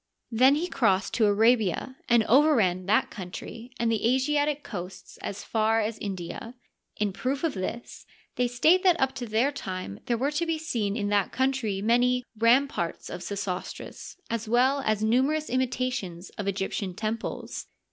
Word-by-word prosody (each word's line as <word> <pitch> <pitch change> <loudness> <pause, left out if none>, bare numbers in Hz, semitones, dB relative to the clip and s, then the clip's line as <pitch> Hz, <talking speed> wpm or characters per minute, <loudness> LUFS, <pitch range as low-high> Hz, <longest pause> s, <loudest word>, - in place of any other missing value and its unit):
Then 255 +5 +5
he 320 +4 -1
crossed 220 - +1
to 225 -2 +3
Arabia 220 +2 +2
and 235 -2 +5
overran 220 - +3
that 215 +3 +2
coun 185 -4 -7
try 230 +6 -8
and 230 -1 +1
the 225 - 0
Asiatic 290 +2 +1
coasts 180 -2 -8
as 200 - -6
far 220 0 +1
as 220 0 -2
India. 195 +4 -6 0.4
In 205 -2 0
proof 265 - -2
of 325 - +1
this, 195 +5 -6 0.3
they 250 0 +1
state 310 +10 +4
that 360 -3 +4
up 265 0 +1
to 245 - -5
their 225 +6 +2
time 185 - -6
there 235 - +1
were 275 +5 0
to 330 +3 -1
be 325 -1 0
seen 235 -10 -2
in 205 -2 -1
that 205 -2 +1
country 260 -7 0
many 245 +2 +3
" - - -54
ramparts 240 -9 +1
of - - -6
Sesostris," 200 -2 -5
as 230 -1 -3
well 260 +4 +3
as 215 -1 +1
numerous 270 +8 +1
imitations 250 -8 -2
of 205 - -6
Egyptian 195 -1 -2
temples. 220 +2 -4
230 Hz, 165 wpm, -27 LUFS, 205-265 Hz, 0.4 s, Then